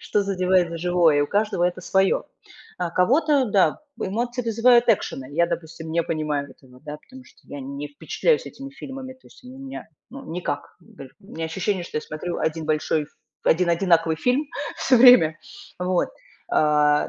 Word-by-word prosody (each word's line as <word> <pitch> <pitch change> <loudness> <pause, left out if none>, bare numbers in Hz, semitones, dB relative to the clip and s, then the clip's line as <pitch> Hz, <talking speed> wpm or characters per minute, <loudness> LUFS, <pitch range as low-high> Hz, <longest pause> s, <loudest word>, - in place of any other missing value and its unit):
Что 210 - 0
задевает 185 -2 +1
за 165 - -5
живое. 175 -3 +3
И - - +3
у 145 - +1
каждого 205 -2 0
это 180 +1 -1
своё. 190 +1 +1 0.5
А 175 -2 -2
кого-то, 270 - +2
да, 195 -6 +2 0.2
эмоции 240 +5 -2
вызывают 235 +2 +4
экшены. 135 - 0
Я, 170 +2 +2
допустим, 160 -1 -6
не 170 0 +2
понимаю 150 -3 -2
этого, 130 -1 -18
да, 150 0 -7
потому 260 +6 -15
что - - -22
я 145 - -8
не 140 +2 -6
впечатляюсь 455 - 0
этими 275 0 -9
фильмами. 265 -1 -8
То 260 - -24
есть - - -19
они 255 +1 -11
у - - -12
меня, 270 0 -8 0.2
ну 270 +1 -10
никак, 155 -4 -5
гэль 135 -1 -13
у 195 - -20
меня 165 - -4
ощущение, 185 +2 -2
что - - -7
я - - 0
смотрю 170 +3 -5
1 160 0 -2
большой, 155 -1 0 0.4
1 175 +1 +3
одинаковый 165 -2 +2
фильм 255 - +1 0.3
всё 255 - +3
время. 230 -11 +7 0.4
Вот. 180 0 0 0.4
А, 150 -1 +3
180 Hz, 180 wpm, -23 LUFS, 155-235 Hz, 0.5 s, время